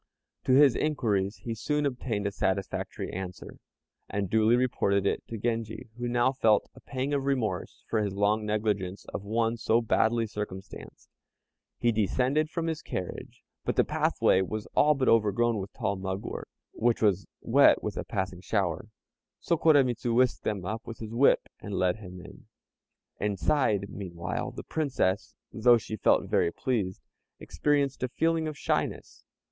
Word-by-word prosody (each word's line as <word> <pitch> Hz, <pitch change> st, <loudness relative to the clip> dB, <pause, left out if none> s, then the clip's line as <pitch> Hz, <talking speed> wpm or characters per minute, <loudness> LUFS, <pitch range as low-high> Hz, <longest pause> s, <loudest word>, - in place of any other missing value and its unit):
To 130 Hz, -, +3 dB
his 140 Hz, -1 st, +6 dB
inquiries 105 Hz, -10 st, 0 dB
he 115 Hz, -, -3 dB
soon 150 Hz, +6 st, -1 dB
obtained 120 Hz, -6 st, -2 dB
a 100 Hz, -, 0 dB
satisfactory 95 Hz, 0 st, -2 dB
answer, 90 Hz, -1 st, -7 dB, 0.5 s
and 100 Hz, -2 st, -2 dB
duly 110 Hz, +1 st, +4 dB
reported 100 Hz, -6 st, +1 dB
it -, -, +1 dB
to 115 Hz, -, -5 dB
Genji, 115 Hz, 0 st, -3 dB
who 120 Hz, -, -2 dB
now 120 Hz, +1 st, +2 dB
felt 110 Hz, -6 st, +3 dB
a -, -, -15 dB
pang 135 Hz, +1 st, -3 dB
of 140 Hz, -1 st, 0 dB
remorse 130 Hz, -6 st, -2 dB
for 110 Hz, -, 0 dB
his 100 Hz, -2 st, -2 dB
long 105 Hz, +2 st, +2 dB
negligence 105 Hz, -3 st, -1 dB
of -, -, -3 dB
one 115 Hz, +2 st, 0 dB
so 115 Hz, 0 st, +2 dB
badly 115 Hz, 0 st, +2 dB
circumstanced. 105 Hz, -3 st, -8 dB, 0.7 s
He 120 Hz, -, +2 dB
descended 130 Hz, +8 st, +1 dB
from 165 Hz, 0 st, -3 dB
his 160 Hz, -2 st, -2 dB
carriage, 90 Hz, -, -6 dB, 0.2 s
but -, -, -1 dB
the -, -, +4 dB
pathway 95 Hz, -, +2 dB
was 105 Hz, +3 st, -3 dB
all 150 Hz, +1 st, +5 dB
but 135 Hz, -1 st, 0 dB
overgrown 115 Hz, +1 st, +3 dB
with 95 Hz, 0 st, -6 dB
tall 110 Hz, -5 st, -2 dB
mugwort, 95 Hz, +1 st, -5 dB, 0.2 s
which 120 Hz, -1 st, +1 dB
was 100 Hz, -2 st, +2 dB, 0.2 s
wet -, -, +5 dB
with -, -, -3 dB
a -, -, -3 dB
passing 95 Hz, -2 st, -3 dB
shower; 95 Hz, -1 st, -1 dB, 0.5 s
so 170 Hz, -, +1 dB
Koremitz 140 Hz, -7 st, +3 dB
whisked 125 Hz, +1 st, +2 dB
them 100 Hz, -4 st, -2 dB, 0.2 s
with 115 Hz, -, -8 dB
his 110 Hz, 0 st, -7 dB
whip, 130 Hz, +4 st, +4 dB
and 100 Hz, -1 st, -6 dB
led 90 Hz, 0 st, +1 dB
him 90 Hz, -4 st, -10 dB
in. -, -, -14 dB, 0.7 s
Inside, 105 Hz, 0 st, +1 dB
meanwhile, 95 Hz, +6 st, -4 dB
the -, -, -8 dB
Princess, 130 Hz, -10 st, -1 dB, 0.2 s
though 120 Hz, +2 st, +5 dB
she 110 Hz, -1 st, -5 dB
felt -, -, +2 dB
very 85 Hz, -, +2 dB
pleased, 100 Hz, -7 st, -2 dB, 0.4 s
experienced 145 Hz, -2 st, 0 dB
a 130 Hz, -, -1 dB
feeling 165 Hz, +3 st, +1 dB
of 155 Hz, -2 st, -5 dB
shyness. -, -, -2 dB
110 Hz, 160 wpm, -28 LUFS, 100-130 Hz, 0.7 s, his